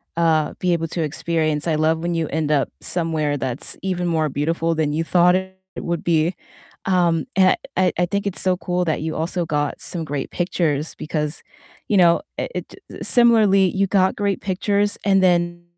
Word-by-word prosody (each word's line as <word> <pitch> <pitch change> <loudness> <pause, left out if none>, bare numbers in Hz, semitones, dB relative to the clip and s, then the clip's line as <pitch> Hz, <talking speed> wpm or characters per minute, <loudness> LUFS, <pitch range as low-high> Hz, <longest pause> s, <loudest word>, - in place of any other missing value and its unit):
uh, 160 -2 +2
be 180 -1 +1
able 165 -1 -1
to 170 - -3
experience. 155 0 -1
I 160 - +1
love 160 +1 +1
when 170 +1 -2
you 165 -2 -1
end 155 0 -2
up 140 -2 +2
somewhere 160 -4 -1
that's 130 0 -2
even 180 -2 -2
more 160 -3 +1
beautiful 165 +4 -1
than 155 -2 0
you 160 +2 0
thought 180 +1 +4
it 190 0 -3 0.2
would 170 -1 -3
be. 165 +1 +1 0.5
Um, 175 -3 +2
and 185 -1 +4 0.2
I 185 0 +2
I 175 - +2
think 200 +3 -2
it's 200 - -3
so 185 -1 +1
cool 180 0 -1
that 155 -2 -1
you 160 0 -3
also 170 +2 -2
got 145 -2 -2
some 170 -3 -4
great 145 -3 -4
pictures 165 -4 -1
because, 150 0 -3 0.5
you 210 - +2
know, 170 +2 +5 0.2
it - - -5
it - - -7
Similarly, 215 -6 +5
you 195 0 +2
got 190 -1 +2
great 200 -2 -1
pictures, 200 +2 0
and 195 -1 +3
then 175 -1 +1
170 Hz, 185 wpm, -21 LUFS, 155-185 Hz, 0.5 s, know